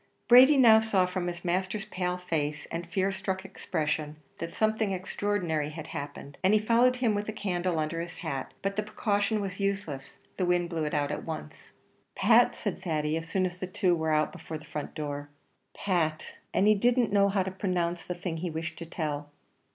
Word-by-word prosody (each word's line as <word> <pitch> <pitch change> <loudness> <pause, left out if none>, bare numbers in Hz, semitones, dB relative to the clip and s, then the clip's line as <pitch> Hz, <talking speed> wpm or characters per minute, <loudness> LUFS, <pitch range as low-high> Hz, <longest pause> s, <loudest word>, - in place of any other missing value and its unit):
Brady 260 +4 +8
now 225 -4 +8
saw 210 -4 +2
from 180 -1 -3
his 175 0 -5
master's 190 +4 -1
pale 180 -3 -2
face, 150 -4 -2
and 170 +1 -4
fear 190 +1 +1
struck 190 0 -3
expression, 155 -5 -2 0.2
that 170 0 -5
something 215 -2 +1
extraordinary 180 -5 -1
had 155 0 -7
happened, 140 0 -7
and 190 +3 +5
he - - +5
followed 235 +4 +4
him 245 -4 +1
with 205 +1 -2
a - - 0
candle 180 -4 -1
under 155 +2 -1
his 170 0 -7
hat; 140 -6 -4
but 195 0 -1
the - - +3
precaution 210 0 0
was 195 -1 -5
useless, 195 -9 -2 0.2
the 185 - +1
wind 175 -1 +1
blew 160 -2 -1
it 150 - -2
out 145 0 0
at - - -4
once. 155 -1 -8 0.4
"Pat," 240 +1 +5
said 205 -6 -4
Thady, 155 -4 0
as 165 0 -4
soon 185 +2 +1
as 180 0 -4
the 185 - -3
two 185 -1 +2
were 160 -1 -1
out 155 0 +2
before 165 -2 -7
the 155 - -14
front 150 - -6
door; 145 -1 -4 0.5
"Pat," 165 -5 -1 0.2
and 200 - +3
he 215 - +7
didn't 235 0 +2
know 200 0 +5
how 195 -1 +1
to 190 - -4
pronounce 180 -2 -1
the 180 - -4
thing 175 -2 -4
he 175 +2 -3
wished 160 +1 -5
to 170 - -7
tell. 150 -3 -3
180 Hz, 205 wpm, -29 LUFS, 160-200 Hz, 0.5 s, Brady